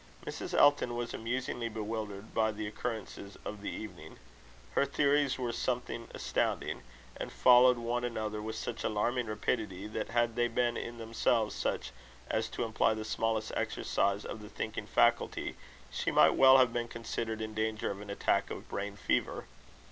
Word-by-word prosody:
Mrs. -, -, -4 dB
Elton 145 Hz, -4 st, +5 dB
was 120 Hz, 0 st, -3 dB
amusingly 120 Hz, 0 st, -2 dB
bewildered 110 Hz, -1 st, -5 dB
by 110 Hz, -1 st, +2 dB
the 110 Hz, 0 st, -5 dB
occurrences 105 Hz, -2 st, -5 dB
of 105 Hz, -1 st, -5 dB
the 100 Hz, -, -3 dB
evening. 90 Hz, -7 st, -8 dB, 0.5 s
Her -, -, +3 dB
theories 140 Hz, 0 st, +2 dB
were 125 Hz, -2 st, -1 dB
something 120 Hz, -1 st, -2 dB
astounding; -, -, -1 dB, 0.4 s
and -, -, -5 dB
followed 125 Hz, 0 st, +7 dB
one 120 Hz, +1 st, -1 dB
another 110 Hz, -3 st, -2 dB
with 110 Hz, +1 st, -4 dB
such 115 Hz, +1 st, -4 dB
alarming 120 Hz, +3 st, 0 dB
rapidity, 105 Hz, -2 st, -2 dB
that 105 Hz, -, -4 dB
had 120 Hz, -1 st, +1 dB
they 120 Hz, 0 st, +2 dB
been 120 Hz, 0 st, +1 dB
in 120 Hz, 0 st, -5 dB
themselves 115 Hz, -1 st, +1 dB
such 60 Hz, -, -2 dB, 0.4 s
as -, -, 0 dB
to -, -, -3 dB
imply 110 Hz, 0 st, +2 dB
the 110 Hz, 0 st, -5 dB
smallest 110 Hz, 0 st, -1 dB
exercise 100 Hz, +1 st, 0 dB
of 110 Hz, -, -6 dB
the 105 Hz, -, -9 dB
thinking -, -, -4 dB
faculty, -, -, +2 dB, 0.4 s
she -, -, -1 dB
might -, -, +6 dB
well 130 Hz, 0 st, +8 dB
have 125 Hz, -3 st, +4 dB
been 120 Hz, -1 st, -1 dB
considered 115 Hz, -1 st, -4 dB
in 110 Hz, 0 st, -4 dB
danger 110 Hz, 0 st, -1 dB
of 100 Hz, 0 st, -6 dB
an 105 Hz, -, -9 dB
attack 100 Hz, -, +1 dB
of -, -, -7 dB
brain 100 Hz, 0 st, -4 dB
fever. -, -, 0 dB
115 Hz, 165 wpm, -32 LUFS, 105-120 Hz, 0.5 s, well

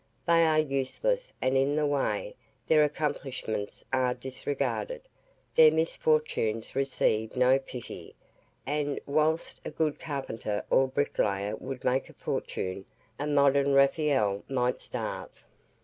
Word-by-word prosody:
They 165 Hz, -1 st, +5 dB
are 155 Hz, -1 st, +3 dB
useless 155 Hz, -, 0 dB
and 130 Hz, +1 st, +2 dB
in 135 Hz, +2 st, +2 dB
the 150 Hz, 0 st, +2 dB
way, 320 Hz, -, -1 dB, 0.3 s
their 155 Hz, -1 st, +5 dB
accomplishments 140 Hz, -8 st, -3 dB
are 130 Hz, -1 st, +2 dB
disregarded, 140 Hz, -, -3 dB, 0.5 s
their 160 Hz, -1 st, +8 dB
misfortunes 155 Hz, -9 st, 0 dB
receive 110 Hz, -5 st, 0 dB
no 130 Hz, +1 st, +4 dB
pity; 125 Hz, -3 st, -9 dB, 0.5 s
and, 145 Hz, 0 st, -1 dB
whilst 155 Hz, +3 st, 0 dB
a -, -, -4 dB
good 155 Hz, -2 st, -1 dB
carpenter 125 Hz, -8 st, -4 dB
or 135 Hz, -, +5 dB
bricklayer 105 Hz, -7 st, 0 dB
would 130 Hz, -1 st, -7 dB
make 130 Hz, +2 st, +1 dB
a -, -, -14 dB
fortune, 95 Hz, +1 st, -4 dB, 0.3 s
a 145 Hz, -, -2 dB
modern 140 Hz, -1 st, +3 dB
Raphael 135 Hz, -8 st, +3 dB
might 125 Hz, -2 st, 0 dB
starve. -, -, -6 dB
140 Hz, 120 wpm, -29 LUFS, 125-155 Hz, 0.5 s, their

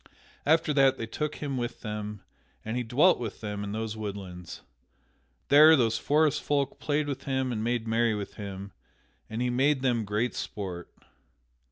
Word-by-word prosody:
After 155 Hz, 0 st, +3 dB
that 135 Hz, -2 st, +4 dB
they 115 Hz, -, -3 dB
took 150 Hz, +6 st, -3 dB
him 140 Hz, -3 st, -4 dB
with 120 Hz, -1 st, -4 dB
them, 105 Hz, -1 st, -5 dB, 0.4 s
and 110 Hz, +2 st, -3 dB
he 125 Hz, -, 0 dB
dwelt 130 Hz, +10 st, +4 dB
with 115 Hz, -4 st, -5 dB
them 105 Hz, -1 st, -4 dB
in 100 Hz, -, -4 dB
those 110 Hz, 0 st, -3 dB
woodlands. 95 Hz, -5 st, -7 dB, 0.9 s
There 155 Hz, +3 st, +9 dB
these 115 Hz, -5 st, +2 dB
forest 150 Hz, 0 st, +2 dB
folk 140 Hz, -2 st, -1 dB
played 150 Hz, 0 st, 0 dB
with 140 Hz, -1 st, -5 dB
him 130 Hz, -1 st, 0 dB
and 110 Hz, -2 st, -2 dB
made 120 Hz, -1 st, -1 dB
merry 115 Hz, 0 st, +2 dB
with 100 Hz, -1 st, -5 dB
him, 100 Hz, -1 st, -7 dB, 0.6 s
and 110 Hz, +3 st, -2 dB
he 125 Hz, -, 0 dB
made 135 Hz, +2 st, +2 dB
them 120 Hz, -3 st, +2 dB
great 105 Hz, +4 st, -1 dB
sport. 90 Hz, -4 st, -5 dB
120 Hz, 170 wpm, -28 LUFS, 105-135 Hz, 0.9 s, There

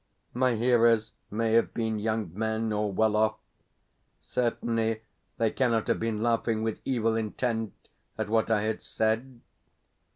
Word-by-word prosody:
My 125 Hz, -1 st, +2 dB
hearers 115 Hz, -2 st, +3 dB, 0.2 s
may 110 Hz, +1 st, 0 dB
have 115 Hz, -, +3 dB
been 110 Hz, -2 st, -1 dB
young 110 Hz, -4 st, -1 dB
men, 110 Hz, +1 st, -1 dB
or 105 Hz, -1 st, 0 dB
well 110 Hz, +2 st, +2 dB
off; 110 Hz, 0 st, +3 dB, 0.8 s
certainly 115 Hz, -2 st, -1 dB, 0.3 s
they 115 Hz, -2 st, +2 dB
cannot 115 Hz, -4 st, +1 dB
have -, -, +2 dB
been 110 Hz, -1 st, -1 dB
laughing 115 Hz, -1 st, +1 dB
with 110 Hz, -1 st, -2 dB
evil 115 Hz, -4 st, +1 dB
intent 110 Hz, 0 st, -2 dB, 0.4 s
at -, -, -2 dB
what 110 Hz, +1 st, +1 dB
I 105 Hz, -2 st, +2 dB
had 110 Hz, 0 st, -2 dB
said. 115 Hz, +3 st, -1 dB
110 Hz, 140 wpm, -28 LUFS, 110-115 Hz, 0.8 s, hearers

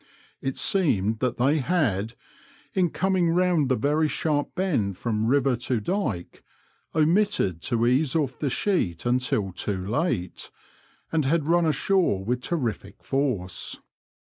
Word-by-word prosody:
It 135 Hz, -1 st, -3 dB
seemed 110 Hz, -, +2 dB
that 125 Hz, -1 st, -1 dB
they 140 Hz, +5 st, +2 dB
had, 115 Hz, -, 0 dB, 0.6 s
in 180 Hz, -3 st, +2 dB
coming 185 Hz, 0 st, +1 dB
round 175 Hz, -6 st, +2 dB
the 130 Hz, -, +3 dB
very 150 Hz, +6 st, +1 dB
sharp 150 Hz, -1 st, -1 dB
bend 125 Hz, -, 0 dB
from 110 Hz, 0 st, -1 dB
river 135 Hz, 0 st, +3 dB
to 120 Hz, 0 st, -1 dB
dyke, 110 Hz, -, -3 dB, 0.5 s
omitted 160 Hz, -, +2 dB
to 115 Hz, +2 st, 0 dB
ease 130 Hz, +4 st, +2 dB
off 140 Hz, -5 st, -1 dB
the 145 Hz, -, 0 dB
sheet 125 Hz, -, 0 dB
until 120 Hz, -5 st, 0 dB
too 95 Hz, +1 st, -3 dB
late, 110 Hz, -, -2 dB, 0.6 s
and 155 Hz, -3 st, +1 dB
had 155 Hz, +2 st, +1 dB
run 170 Hz, +1 st, +3 dB
ashore 155 Hz, -, +1 dB
with 125 Hz, +2 st, -1 dB
terrific 120 Hz, -, -3 dB
force. 125 Hz, -10 st, -1 dB
135 Hz, 135 wpm, -25 LUFS, 110-165 Hz, 0.6 s, the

